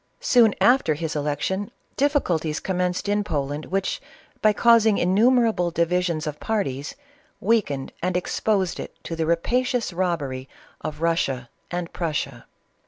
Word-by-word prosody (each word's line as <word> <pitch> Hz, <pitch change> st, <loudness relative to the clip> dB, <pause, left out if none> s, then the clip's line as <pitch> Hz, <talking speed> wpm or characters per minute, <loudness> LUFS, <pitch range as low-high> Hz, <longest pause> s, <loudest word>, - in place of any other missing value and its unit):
Soon 230 Hz, -4 st, +5 dB
after 245 Hz, -, +4 dB
his 155 Hz, 0 st, -4 dB
election, 150 Hz, +7 st, -1 dB, 0.3 s
diffi 285 Hz, +1 st, +2 dB
culties 155 Hz, -3 st, -1 dB
commenced 180 Hz, 0 st, -1 dB
in 205 Hz, 0 st, +1 dB
Poland, 145 Hz, -3 st, -3 dB
which, 195 Hz, 0 st, -1 dB, 0.4 s
by 215 Hz, -, +5 dB
causing 225 Hz, 0 st, +5 dB
innu 195 Hz, +7 st, +4 dB
merable 225 Hz, -8 st, +2 dB
divisions 170 Hz, -1 st, 0 dB
of 150 Hz, -1 st, -4 dB
parties, 145 Hz, -11 st, -2 dB, 0.4 s
weakened 185 Hz, -11 st, 0 dB
and 180 Hz, +1 st, 0 dB
exposed 190 Hz, 0 st, 0 dB
it -, -, -7 dB
to 165 Hz, -, -4 dB
the 160 Hz, -1 st, -1 dB
rapacious 245 Hz, -, 0 dB
robbery 145 Hz, -8 st, -2 dB, 0.3 s
of 150 Hz, -, -4 dB
Eussia 150 Hz, -7 st, 0 dB, 0.2 s
and 175 Hz, -1 st, -4 dB
Prussia. 150 Hz, -7 st, -3 dB
175 Hz, 135 wpm, -24 LUFS, 155-210 Hz, 0.4 s, Soon